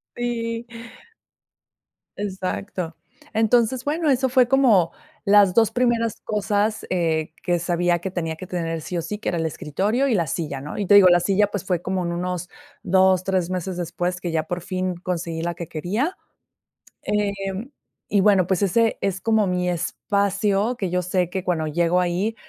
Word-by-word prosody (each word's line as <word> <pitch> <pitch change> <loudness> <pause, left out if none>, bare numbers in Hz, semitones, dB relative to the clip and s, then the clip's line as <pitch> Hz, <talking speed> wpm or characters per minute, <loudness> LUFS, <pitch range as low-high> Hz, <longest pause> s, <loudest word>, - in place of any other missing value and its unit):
Sí. 235 -1 -3 1.5
Exacto, 185 -3 -4 0.4
entonces 235 +3 +2
bueno, 310 +1 0
eso 260 0 +3
fue 250 -1 +4
como 240 -10 +4 0.3
las 200 -3 +5
2 225 0 +4
primeras 235 -3 +1
cosas, 210 +1 0
eh, 160 -3 0
que 175 -1 +1
sabía 175 0 +1
que 190 +1 -5
tenía 165 -3 -3
que 180 +3 -9
tener 165 -3 -3
sí 175 +3 -4
o - - 0
sí, 210 +6 -5
que 215 - -3
era 175 - -1
el 165 - -1
escritorio 200 - -1
y - - +2
la 170 -4 +1
silla, 140 -2 -3
¿no?, 145 +2 -7
y 205 - -1
te 205 - +6
digo, 195 -2 +9
la 175 0 +5
silla, 200 +2 +2
pues, 205 -2 -4
fue 180 -3 -1
como 185 0 -2
en 170 - -2
unos 180 0 -3 0.3
2, 185 0 +4
3 185 -2 0
meses 185 0 -3
después 175 +1 -2
que 175 -3 -4
ya 160 -1 0
por 175 +2 -4
fin 185 0 -2
conseguí 170 -2 -4
la 170 0 -2
que 170 -2 -6
quería. 210 - -2 0.9
Eh, 210 -1 0 0.8
y 200 - +4
bueno, 195 -4 +4
pues, 190 +1 +1
ese 225 +4 +2
es 195 -1 -1
como 220 -1 +2
mi 180 0 0
espacio 200 +5 0
que 190 -5 -3
yo 180 0 +1
sé 180 0 0
que 190 -1 -3
cuando 160 -3 0
llego 170 +3 +2
ahí 180 +5 0
185 Hz, 180 wpm, -23 LUFS, 175-210 Hz, 1.5 s, digo